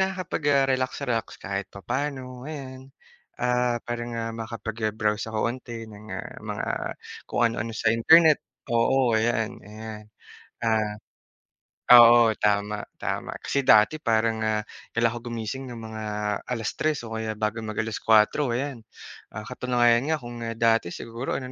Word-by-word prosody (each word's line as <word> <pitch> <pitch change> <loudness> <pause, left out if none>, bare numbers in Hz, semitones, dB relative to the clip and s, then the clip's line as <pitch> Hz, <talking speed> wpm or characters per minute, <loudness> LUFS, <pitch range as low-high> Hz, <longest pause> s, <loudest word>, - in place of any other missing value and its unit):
nakakapag-relax-relax 140 - 0
kahit 100 0 -4
papaano 130 +3 -4
ayan. 135 -3 -8 0.5
Ah, 125 -1 +1
parang, 120 0 -4
ah, 115 0 -3
makapag, 110 -1 -4
ah, - - -16
browse 105 0 0
ako 110 +1 0
unti 120 -3 -8
ng, 105 0 -12
ah, - - -6
mga - - -4 0.6
kung - - -1
ano-ano 115 0 -2
sa 110 -1 +2
internet 160 +6 +6 0.3
oo, 120 +1 +3
ayan, 110 0 +1
ayan. 110 +1 -9 0.6
Ah, 110 -2 +1 1.0
oo, 120 -1 +8
tama, 105 0 0
tama - - -4
kasi 140 - 0
dati 110 +9 +6
parang, 115 -3 +1
ah, 110 -1 0 0.3
kailangan 115 0 +1
ako - - -18
gumising 120 +3 -4
ng 120 -1 -7
mga 110 0 -6 0.4
3:00 125 +5 -1
o 115 - -8
kaya 110 -1 -3
bago 110 +1 -2
mag 110 -1 -5
4:00 110 +4 +2
ayan. 135 -1 -3 0.6
Ah, 110 - -5
katunayan 120 +1 +2
nga 160 - +2
kung, 120 0 -7
ah, 115 - -4
dati 115 -6 +2
siguro 115 +3 -4
ano 130 -1 -5
115 Hz, 140 wpm, -26 LUFS, 110-125 Hz, 1.0 s, oo